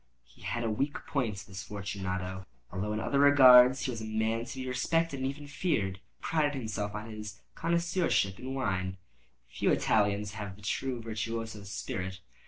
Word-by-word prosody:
He 65 - -22
had 120 - -2
a 115 - 0
weak 140 +7 -1
point—this 105 -8 -3
Fortunato—although 95 -3 -5
in 105 - -1
other 140 +5 0
regards 130 -3 +8
he 130 - -1
was 115 -2 -5
a - - -4
man 110 +1 0
to - - -7
be 130 0 -4
respected 140 +4 0
and 130 - 0
even 145 +1 -7
feared. 145 - -1
He - - -26 0.2
prided 150 -3 +1
himself 105 -4 -3
on 105 +1 -5
his 105 0 -7
connoisseurship 170 - +1
in 130 +1 -5
wine. 95 -7 -1 0.5
Few - - -1
Italians 105 -1 +2
have 105 -3 -6
the 105 - -17
true 125 +3 -2
virtuoso 115 -1 -4
spirit. 95 -2 -4
110 Hz, 165 wpm, -30 LUFS, 100-130 Hz, 0.5 s, regards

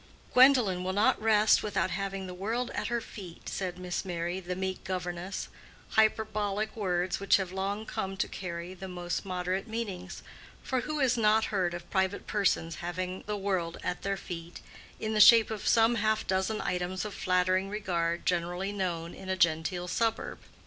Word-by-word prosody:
"Gwendolen 250 -9 +6
will 185 +1 -1
not 205 +2 +3
rest 215 -1 +5
without 185 -3 -1
having 195 0 -3
the 180 - -6
world 225 +7 -2
at - - -2
her 235 0 -1
feet," 185 -6 -10
said 185 -2 -3
Miss 180 -1 -3
Merry, 175 0 -3
the 180 0 -4
meek 190 0 -3
governess: 180 0 -4 0.4
hyperbolical 215 0 +1
words 180 -1 0
which 200 - +4
have 190 -2 -3
long 200 +3 -2
come 195 -2 -4
to - - 0
carry 175 -1 -6
the 190 +1 -8
most 175 +1 -3
moderate 185 +2 -2
meanings; 200 -5 -5 0.4
for 260 -2 0
who 305 +4 -3
has 255 -2 +3
not 220 0 +4
heard 180 -3 +1
of 175 0 -8
private 190 0 0
persons 165 -6 0
having 180 +2 -4
the 210 -1 -1
world 185 -4 -1
at 180 - -2
their 195 0 -1
feet 170 -2 -7 0.4
in 220 0 -2
the 215 - +4
shape 225 +1 +8
of 215 -2 -4
some 225 +1 +5
half 220 -1 +1
dozen 190 +3 0
items 180 +1 -2
of 210 - -5
flattering 185 +1 +1
regard 175 -5 -1
generally 175 +2 0
known 175 -4 -3
in 190 - -9
a 190 - 0
genteel 170 +1 +1
suburb? 225 +4 -1
190 Hz, 175 wpm, -30 LUFS, 180-210 Hz, 0.4 s, shape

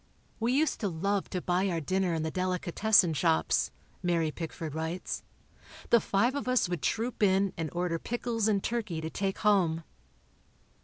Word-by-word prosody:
We 230 +2 +1
used 300 +3 +1
to 210 - -1
love 195 +3 -1
to 180 - -3
buy 185 +2 +1
our 170 -2 -1
dinner 185 +2 0
in 160 - -1
the 160 - -2
delicatessen 185 +1 +2
shops 80 - +2 0.3
[Mary 170 -3 +1
Pickford 160 -1 -6
writes]. 160 +3 -3 0.7
The 235 - +6
five 235 +6 +2
of 285 -2 -3
us 255 -5 +3
would 175 -4 -3
troop 225 - -1
in 195 -1 +3
and 165 -2 -3
order 175 -1 -1
pickles 230 -1 -1
and 200 -3 +1
turkey 220 -8 -2
to 160 0 -5
take 195 -1 -2
home. 180 -6 +2
185 Hz, 165 wpm, -30 LUFS, 165-210 Hz, 0.7 s, The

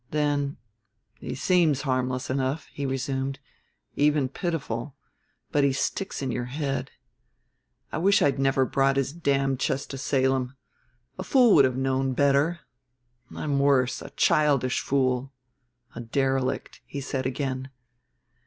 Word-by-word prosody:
Then, 145 -1 0 0.6
"He - - -5
seems 155 -3 +2
harmless 130 -2 -1
enough," 135 +3 -1
he 140 -1 -3
resumed, 135 +1 -2 0.6
"even 145 -2 +2
pitiful; 140 - -4 0.6
but 145 - +2
he 140 - +4
sticks 190 +4 -2
in 130 - -1
your 120 0 -2
head. 140 +2 -3 1.0
I - - -2
wish 200 +4 +4
I'd 140 -1 +2
never 135 0 +2
brought 135 +1 +2
his 135 +1 0
damned 135 -5 0
chest 135 +1 -1
to 135 - -6
Salem. 130 -1 0 0.6
A - - -2
fool 245 0 +5
would 140 - +7
have 130 -1 -1
known 135 0 0
better. 140 +5 +2 0.7
I'm 145 -2 -1
worse 130 -3 +2
a - - -8
childish 140 -4 +2
fool. 130 -1 0 0.6
A - - -8
derelict," 130 +2 -1
he 140 - -5
said 135 -1 -2
again. 130 0 -3
135 Hz, 135 wpm, -26 LUFS, 130-145 Hz, 1.0 s, would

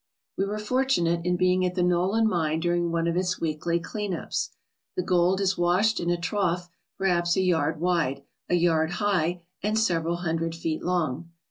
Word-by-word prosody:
We 195 - 0
were 205 +2 -3
fortunate 210 -7 +1
in 180 0 +1
being 185 0 +2
at 180 0 -1
the 180 - +1
Nolan 185 +6 +2
mine 160 -5 0
during 175 0 0
one 165 0 0
of 170 - 0
its 180 0 0
weekly 165 +2 -1
clean 205 +2 -4
ups. - - -3 0.5
The 180 - -1
gold 180 +1 +2
is 190 -2 0
washed 185 +6 +2
in 170 - -1
a 175 - +2
trough 180 -1 -1 0.3
perhaps 175 -2 +1
a - - +2
yard 160 -4 +1
wide, 165 -6 0 0.3
a 180 - +3
yard 165 -1 +2
high, 175 -3 0 0.2
and 210 +2 0
several 170 -6 +1
hundred 165 -1 -2
feet 165 -1 -3
long. 170 -3 -1
175 Hz, 185 wpm, -26 LUFS, 165-185 Hz, 0.5 s, a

